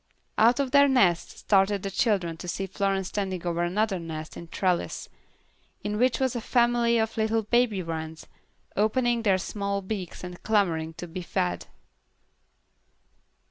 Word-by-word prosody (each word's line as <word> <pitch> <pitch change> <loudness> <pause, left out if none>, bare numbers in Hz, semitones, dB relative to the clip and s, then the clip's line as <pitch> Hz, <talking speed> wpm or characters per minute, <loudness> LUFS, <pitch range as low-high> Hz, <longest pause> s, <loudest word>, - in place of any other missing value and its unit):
Out 235 +4 +5
of 270 -2 0
their 280 +1 +6
nests 195 -11 +2
started 195 -1 +2
the 195 - -3
children 190 -6 +1
to 180 - -8
see 195 +2 -2
Florence 195 0 -1
standing 190 -4 -3
over 170 0 -1
another 190 +3 0
nest 160 -2 -7
in 170 - -8
a - - -18
trellis, 180 0 -1 0.7
in 210 0 -2
which 250 0 +2
was 260 -2 0
a 240 - -2
family 240 0 +2
of 220 0 -1
little 220 0 +1
baby 220 -3 +2
wrens, 160 -1 -5 0.5
opening 235 +3 +2
their 200 -4 +3
small 200 +1 -2
beaks 190 -3 -5
and 180 -1 -8
clamoring 165 -7 +1
to 175 - -7
be 175 +2 -6
fed. 90 - -2
200 Hz, 155 wpm, -27 LUFS, 175-225 Hz, 0.7 s, their